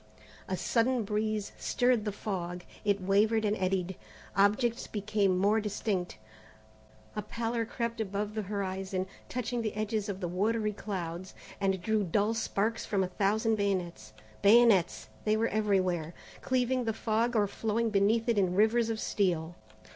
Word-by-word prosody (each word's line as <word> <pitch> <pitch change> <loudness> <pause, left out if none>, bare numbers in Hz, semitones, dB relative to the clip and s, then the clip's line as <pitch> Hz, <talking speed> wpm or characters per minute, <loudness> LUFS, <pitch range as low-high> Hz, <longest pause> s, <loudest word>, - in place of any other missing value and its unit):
A - - -2
sudden 240 0 +1
breeze 210 0 -1
stirred 245 -3 +2
the 210 - 0
fog. 180 -4 -4 0.2
It 205 -1 +2
wavered 215 +3 +3
and 210 0 +2
eddied. 185 -1 -1 0.4
Objects 220 +5 +2
became 205 -2 +1
more 205 +4 +3
distinct. 200 - -2 1.0
A 210 - -1
pallor 230 +2 -2
crept 235 -1 -3
above 205 0 -3
the 215 - -2
horizon, 190 -1 -3 0.2
touching 245 -1 -2
the 215 -2 -3
edges 215 -1 -1
of 195 -1 -4
the 180 - -2
watery 210 +4 0
clouds, 185 -3 -5 0.2
and 195 -1 +1
drew 220 0 +1
dull 205 +5 +1
sparks 225 0 -1
from 200 -3 0
a - - -1
thousand 215 +4 +1
bayonets. 180 - -2 0.3
Bayonets 210 -4 +5 0.2
they 215 0 +2
were 230 +1 +1
everywhere, 185 -6 0 0.3
cleaving 255 -1 +1
the 225 - 0
fog 230 +2 0
or 210 -2 +4
flowing 225 +2 -1
beneath 215 +3 +2
it 230 -3 +3
in 180 -2 +1
rivers 220 +3 +3
of 225 -1 -2
steel. 175 -6 0
210 Hz, 150 wpm, -30 LUFS, 190-225 Hz, 1.0 s, Bayonets